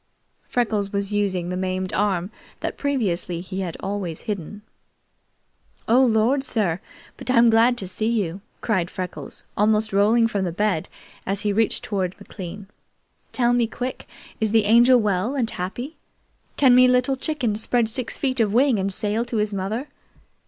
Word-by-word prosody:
Freckles 215 -5 0
was 200 0 -2
using 190 -4 0
the 180 - -2
maimed 185 0 -2
arm 195 -2 0 0.3
that - - -3
previously 190 -11 -1
he 190 +2 -4 0.2
always 190 -5 -4
had - - -19
hidden. 205 -1 -5 1.2
"Oh 250 +3 +5
Lord, 240 +3 +2
sir, 200 -10 0 0.4
but - - -7
I'm 235 -2 +5
glad 235 +2 +4
to 195 - -2
see 215 +4 -2
you!" 195 -5 -1 0.2
cried 185 -6 0
Freckles, 185 -1 -6
almost 215 0 +2
rolling 215 +4 +4
from 200 -3 -2
the 175 - -1
bed 185 -2 -1 0.3
as 195 +1 -2
he 205 -1 0
reached 220 +1 +1
toward 190 -3 -2
McLean. 195 0 -8 0.7
"Tell 240 -1 +2
me 240 -1 +2
quick, 250 +3 -5 0.3
is 220 -2 +1
the 220 -2 +3
Angel 240 +4 +6
well 210 +4 0
and 250 -5 0
happy? 240 - -5 0.6
Can 265 -3 +6
me 255 0 +7
Little 250 +2 +3
Chicken 265 -6 -1
spread 225 +2 +1
six 245 +3 -3
feet 260 -2 -1
of 215 -3 +2
wing 245 0 +3
and 195 +1 -1
sail 210 +4 +1
to 235 - -3
his 210 -1 0
mother? 205 +8 -3
210 Hz, 165 wpm, -23 LUFS, 190-240 Hz, 1.2 s, me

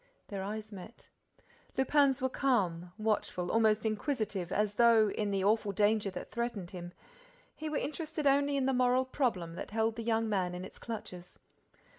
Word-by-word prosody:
Their 200 -2 -4
eyes 215 +2 -5
met. 200 +3 -11 0.7
Lupin's 270 -1 +3
were - - +4
calm, 185 -11 0
watchful, 210 -5 -1
almost 220 -1 +3
inquisitive, 215 - -2
as 210 0 +1
though, 225 -2 +5
in 210 0 -1
the 195 -1 0
awful 210 0 +2
danger 205 +1 +2
that 180 - -7
threatened 235 -7 -3
him, 175 -1 -7 0.6
he 310 0 -5
were 300 - -1
interested 310 0 -3
only 280 +1 +3
in 270 - +1
the 270 - +2
moral 250 +1 +3
problem 225 - -1
that 175 - -6
held 220 +1 0
the - - -3
young 225 0 +1
man 185 -4 0
in 180 +1 -5
its - - -12
clutches. 180 -6 -7
220 Hz, 170 wpm, -32 LUFS, 195-255 Hz, 0.7 s, though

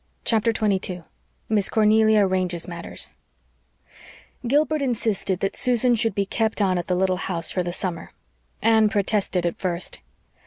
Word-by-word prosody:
CHAPTER 230 0 +2
22 195 -5 -1 0.4
MISS 210 -3 +1
CORNELIA 220 0 +4
ARRANGES 185 -2 -1
MATTERS 170 -1 -6 1.4
Gilbert 300 +3 +2
insisted 220 -7 -1
that 195 - -1
Susan 250 -1 +3
should 225 -3 0
be 200 - 0
kept 220 +2 -1
on 185 -3 +2
at 175 - -5
the 180 - +1
little 185 0 +1
house 170 -3 -2
for 185 - -1
the 175 0 -3
summer. 175 -1 -4 0.5
Anne 220 -1 +4
protested 200 -3 0
at 170 - -2
first. 180 -1 -3
200 Hz, 145 wpm, -23 LUFS, 180-220 Hz, 1.4 s, CORNELIA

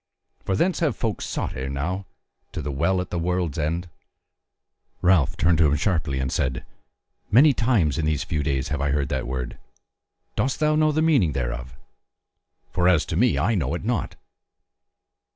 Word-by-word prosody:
For 95 - -1
thence 180 - +1
have 155 -8 +1
folk 110 -5 -2
sought - - -3
ere 65 +1 -4
now 90 +8 -3 0.5
to - - -4
the 75 - -3
WELL 85 +7 +1
AT 90 - -7
THE 85 - -1
WORLD'S 90 -2 -1
END." 85 +4 -1 1.2
Ralph 90 -6 +3
turned 85 -1 +3
to 80 - +6
him 75 - +2
sharply 80 -6 0
and 65 -1 -2
said: 65 0 -1 0.6
"Many 140 +7 +6
times 105 - +1
in 80 - 0
these 75 -2 0
few 75 -2 -2
days 70 -2 -1
have 75 -1 -2
I 70 - 0
heard 70 -1 0
that 65 -3 -2
word. 65 -1 -4 0.8
Dost 130 +1 0
thou 155 -1 +3
know 155 0 +3
the 155 +1 +1
meaning 130 - +3
thereof? 60 0 -4 0.9
For 90 0 +2
as 85 -4 +3
to - - -4
me 120 +7 +3
I 115 - +2
know 80 -6 0
it 85 - -6
not." 115 -3 -1
85 Hz, 180 wpm, -24 LUFS, 70-100 Hz, 1.2 s, to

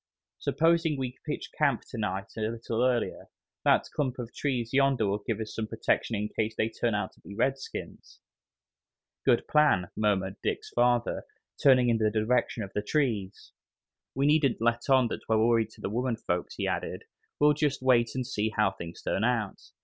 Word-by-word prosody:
"Supposing 165 -1 +2
we 130 -1 -4
pitch 150 - -4
camp 140 -6 +1
to - - -6
night 100 -2 -3
a 110 - -4
little 115 +1 -2
earlier. 125 -2 0 0.4
That - - +4
clump 130 -4 -1
of 120 -2 -6
trees 125 -5 -2
yonder 135 -4 +3
will 100 +1 -1
give 115 -2 -1
us 110 -1 -5
some 110 -1 -3
protection 115 +1 0
in 105 0 -1
case 110 0 -1
they 110 - 0
turn 115 0 -1
out 105 -2 -2
to - - -25
be 100 - -10
redskins." 135 +4 -3 1.1
"Good 120 -3 +3
plan," 145 - +3
murmured 100 -3 0
Dick's - - -3
father, 120 -1 +1 0.4
turning 130 -3 +5
in 115 -1 +2
the 110 -1 +3
direction 115 +1 0
of 95 - -9
the 105 - 0
trees. 105 -7 -1 0.6
"We 135 +1 +1
needn't 145 -3 +3
let 120 +3 0
on 130 -2 +5 0.2
we're 110 - +4
worried 115 0 +3
to - - -16
the - - -2
women 120 +1 0
folks," 90 -5 -3
he - - -2
added, - - -3 0.4
"we'll 150 0 +5
just 145 -3 -1
wait 120 -2 +3
and 130 -1 -1
see 110 -4 -1
how 105 -2 +2
things 85 -2 -9
turn 100 - -1
out. 115 -4 0
115 Hz, 180 wpm, -28 LUFS, 110-130 Hz, 1.1 s, turning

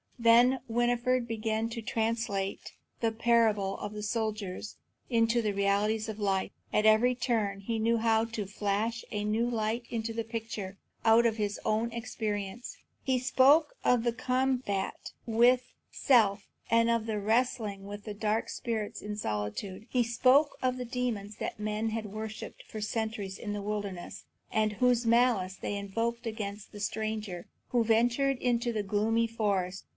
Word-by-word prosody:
Then 240 +2 +5
Winfried 240 +1 +1
began 220 0 -1
to 230 0 -5
translate 220 -3 -2 0.3
the 225 -1 +2
parable 220 -4 +2
of 205 - -5
the 210 0 -6
soldier 215 -3 -2 0.5
into 230 0 +3
the 215 -2 0
realities 205 +2 +1
of 220 0 -6
life. 195 -2 0 0.2
At 210 - +2
every 220 +4 +5
turn 225 -5 -1
he 225 +3 -2
knew 230 +1 +2
how 225 0 +3
to 225 -2 -4
flash 210 +3 -1
a 210 -1 -2
new 220 +3 +1
light 230 +1 -1
into 225 -1 -3
the 230 0 -2
picture 220 -4 -5 0.3
out 225 +1 +6
of 225 -1 +2
his 205 -1 -2
own 225 +2 +1
experience. 220 -2 -4 0.3
He 260 -1 +2
spoke 270 +4 +4
of 245 -2 +3
the 235 -1 +1
combat 255 -5 -1 0.2
with 240 +3 +4 0.3
self, 210 -7 +3 0.2
and 230 +1 +4
of 230 -1 +1
the 215 -2 -1
wrestling 215 -2 0
with 205 +2 -8
dark 220 +1 0
spirits 225 -4 -3
in 210 0 -5
solitude. 150 - -4
He 250 -2 +2
spoke 255 +5 +3
of 255 0 +1
the 250 - -4
demons 230 -4 -3
that - - -4
men 215 +1 -1
had 220 -1 -3
worshipped 215 +1 -7
for 215 - -6
centuries 215 -3 -3
in 205 -2 -4
the 205 - -3
wilderness, 200 -3 -5 0.3
and 215 -1 +1
whose 245 +1 +2
malice 230 -5 +3
they 205 - -3
invoked 230 +4 -2
against 210 -2 -5
the 205 - -9
stranger 215 -4 -3 0.2
who 240 -2 +2
ventured 240 +4 +2
into 240 -1 0
the 215 -2 -1
gloomy 215 +3 +1
forest. 200 -4 -1
220 Hz, 155 wpm, -30 LUFS, 205-235 Hz, 0.5 s, out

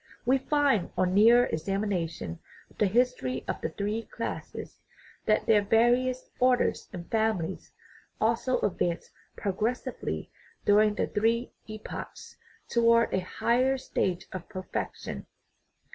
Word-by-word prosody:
We 265 +2 +4
find, 280 - +2
on 185 0 +2
nearer 230 +5 +7
examination 170 - -2 0.3
of - - -24
the 210 - +4
history 220 - 0
of - - -3
the - - -1
three 210 +6 -2
classes, - - -6 0.5
that 215 - +3
their 215 -2 +5
various 245 +4 +2
orders 250 -1 +2
and 175 -3 -7
families 220 -6 -1 0.5
also 235 +3 +1
advanced 175 -3 -1 0.3
progressively 215 - -2 0.3
during 210 +1 +5
the - - +1
three 230 +3 0 0.2
epochs 215 0 -8 0.3
towards 230 0 +4
a - - +3
higher 250 +8 +1
stage 190 -7 -1
of 185 -2 -7
perfection. 185 0 -5
215 Hz, 115 wpm, -28 LUFS, 185-240 Hz, 0.5 s, nearer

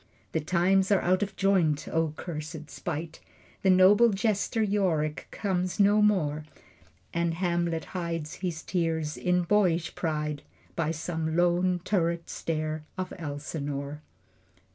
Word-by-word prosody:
The - - 0
times 185 +5 +2
are 200 - +4
out 185 +2 +2
of 200 -1 -2
joint! 175 -7 +2
O 160 -2 0
cursed 155 -2 -6
spite! 160 -1 -5 0.4
The 190 - +3
noble 190 +5 +7
jester 210 +2 0
Yorick 180 -8 0
comes 185 -2 -2
no 205 +1 +5
more. 155 -8 +2 0.7
And 170 -1 0
Hamlet 170 -2 0
hides 165 -3 -3
his 170 -4 -3
tears 160 -4 -1
in 180 0 +1
boyish 175 -3 +2
pride 150 -3 -2 0.3
By 165 -2 0
some 160 0 -2
lone 175 +1 +2
turret 170 -4 0
stair 155 -1 -3
of 185 -1 -4
Elsinore. 145 -1 -4
170 Hz, 125 wpm, -28 LUFS, 155-185 Hz, 0.7 s, noble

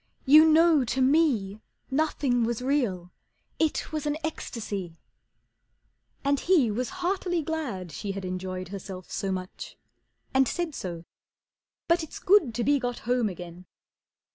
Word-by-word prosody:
"You 305 +4 +8
know 320 -2 +5
to 245 +2 -2
me 255 -8 +2 0.3
Nothing 270 -4 +1
was 235 +1 -2
real, 225 -11 0 0.5
it 315 -1 0
was 305 -1 -3
an 295 +1 0
ecstasy." 205 - -5 1.3
And 280 0 +2
he 315 - +3
was 245 +4 -2 0.2
heartily 355 -3 0
glad 260 - -4
she 195 +6 -4
had 195 -1 -5
enjoyed 185 0 -4
Herself 190 -2 -8
so 195 - -2
much, 185 -1 -6 0.6
and 265 -1 +4
said 345 -3 -2
so. 170 -7 -6 0.8
"But 335 +1 +3
it's 320 - -7
good 360 - +3
To 240 - 0
be 285 +2 +3
got 245 -2 -3
home 245 -2 +1
again." 180 0 -9
245 Hz, 140 wpm, -27 LUFS, 190-310 Hz, 1.3 s, You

